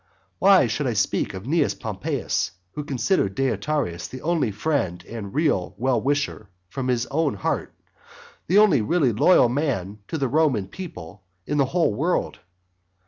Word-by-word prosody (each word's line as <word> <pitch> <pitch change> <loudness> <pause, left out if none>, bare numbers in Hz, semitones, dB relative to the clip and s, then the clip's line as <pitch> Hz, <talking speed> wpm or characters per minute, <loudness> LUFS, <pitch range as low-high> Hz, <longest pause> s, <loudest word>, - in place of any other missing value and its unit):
Why - - +6
should - - -1
I - - 0
speak - - 0
of 95 - -7
Cnaeus 140 -6 +1
Pompeius, 105 - -2 0.2
who 150 - -5
considered 135 - 0
Deiotarus 135 - -1
the 130 - -9
only 165 -7 +1
friend 100 - -2
and 110 -4 -7
real 145 - 0
well 125 -2 +1
wisher 140 -6 -1 0.2
from 130 +5 -4
his 120 -2 +1
heart, 145 - -1 0.7
the 185 - +3
only 200 - +5
really 145 +2 +2
loyal 140 - +5
man 115 - -2
to 160 - -3
the 135 -3 0
Roman 130 -8 +1
people 100 - -9 0.2
in 150 0 -1
the 140 - +4
whole 165 -3 +1
world? 160 - -1
130 Hz, 150 wpm, -24 LUFS, 105-155 Hz, 0.7 s, Why